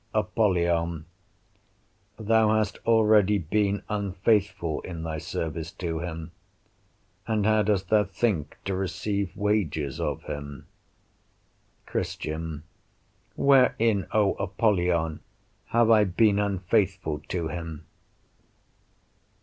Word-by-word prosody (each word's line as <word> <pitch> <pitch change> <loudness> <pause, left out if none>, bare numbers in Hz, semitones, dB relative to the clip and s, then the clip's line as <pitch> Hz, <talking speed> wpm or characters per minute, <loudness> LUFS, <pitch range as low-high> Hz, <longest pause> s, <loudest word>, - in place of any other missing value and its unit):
Apollyon 85 -5 +1 1.1
Thou 110 0 +3
hast 110 -1 -1
already 105 -3 +4
been 100 +3 0
unfaithful 100 -4 0
in 85 -3 -7
thy 80 -1 -3
service 80 +1 -4
to 85 -3 -3
him, 80 -1 -6 1.0
and 110 -3 0
how 110 0 +4
dost 100 -3 0
thou 105 -1 +4
think 95 -6 -2
to 95 - -1
receive 100 +1 -2
wages 90 -9 -1
of - - -2
him? 70 -2 -7 1.2
Christian 80 -1 -4 0.7
Wherein, 115 -7 +3
O 105 -2 +3
Apollyon, 90 -6 +1 0.5
have 115 0 +3
I 105 -2 +6
been 100 +2 +3
unfaithful 95 -4 0
to 85 -3 -2
him? 80 -3 -6
95 Hz, 95 wpm, -26 LUFS, 85-105 Hz, 1.2 s, I